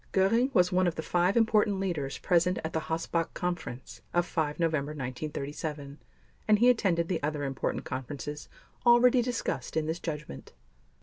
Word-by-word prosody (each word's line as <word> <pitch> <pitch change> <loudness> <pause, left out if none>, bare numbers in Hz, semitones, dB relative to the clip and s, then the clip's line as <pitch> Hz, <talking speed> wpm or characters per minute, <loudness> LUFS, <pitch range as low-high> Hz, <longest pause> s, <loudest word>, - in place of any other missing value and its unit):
Göring 230 +8 +3
was 180 0 +4
one 185 0 +3
of 170 - -1
the 160 - -4
five 180 +6 +2
important 215 -3 +3
leaders 160 -8 -2
present 180 0 +2
at 160 - -4
the 160 - +1
Hossbach 165 0 -1
Conference 175 -8 -5
of 175 0 +3
5 155 -3 -2
November 155 -3 0
1937, 145 +1 -5 0.5
and 215 -1 +5
he 240 +4 +5
attended 175 -8 +1
the 180 - -1
other 150 0 -2
important 135 -1 -2
conferences 145 +3 -6 0.3
already 245 +1 +6
discussed 240 -8 -3
in 155 - +1
this 160 +2 -2
Judgment. 150 - -6
165 Hz, 160 wpm, -29 LUFS, 150-190 Hz, 0.5 s, already